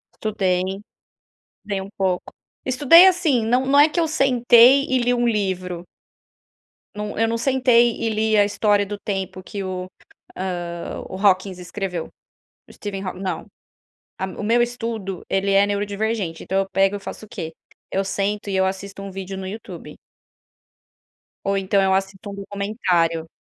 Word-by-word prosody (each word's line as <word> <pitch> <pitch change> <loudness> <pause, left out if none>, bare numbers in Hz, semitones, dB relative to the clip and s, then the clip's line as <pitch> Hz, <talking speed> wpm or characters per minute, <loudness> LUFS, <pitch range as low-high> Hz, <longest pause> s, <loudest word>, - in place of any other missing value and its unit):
Estudei, 190 -4 0
estudei 195 +2 -7 0.8
um 190 - -7
pouco. 185 -2 -1 0.3
Estudei, 290 +7 +7
assim, 330 -11 +3
não, 250 +3 +2
não 280 +1 +4
é 295 - +7
que 315 - -4
eu 330 - +2
sentei 255 -2 +5
e 260 - +1
li 245 +1 +2
um 240 0 +1
livro. 185 -5 -2 1.1
Não, 210 0 -5
eu 225 +1 +2
não 230 +1 -1
sentei 245 -2 +4
e 225 - +1
li 220 0 +1
a 205 - +6
história 205 0 +2
do 205 0 -6
tempo 190 -2 -4
que 200 +1 -6
o 185 -1 -5 0.8
ah, 170 0 -6
o - - -7
Hawkins 190 -1 +2
escreveu. 180 -1 -4 0.6
O - - -14
Steven 195 -2 -6
Haw 185 - -4
não. 185 -3 -4 0.7
A 190 - -2
O 190 - -7
meu 230 +3 +3
estudo, 230 -6 -3
ele 195 +1 +1
é 195 +1 +5
neurodivergente, 205 -3 -2
então 190 - -1
eu 195 0 0
pego 195 +1 +2
eu - - -8
faço 215 - -8
o - - -23
quê? 160 -4 -6 0.4
Eu 195 +1 0
sento 200 +1 -2
e 195 - 0
eu 190 0 +3
assisto 195 +1 -5
um 195 - -6
vídeo 195 0 -6
no 190 - -6
YouTube. 215 +4 -8 1.5
Ou 195 0 +1
então, 195 +1 +2
eu 190 0 +3
assisto 195 +1 -2
um - - -7
documentário. 195 -5 -1
200 Hz, 165 wpm, -22 LUFS, 190-230 Hz, 1.5 s, Estudei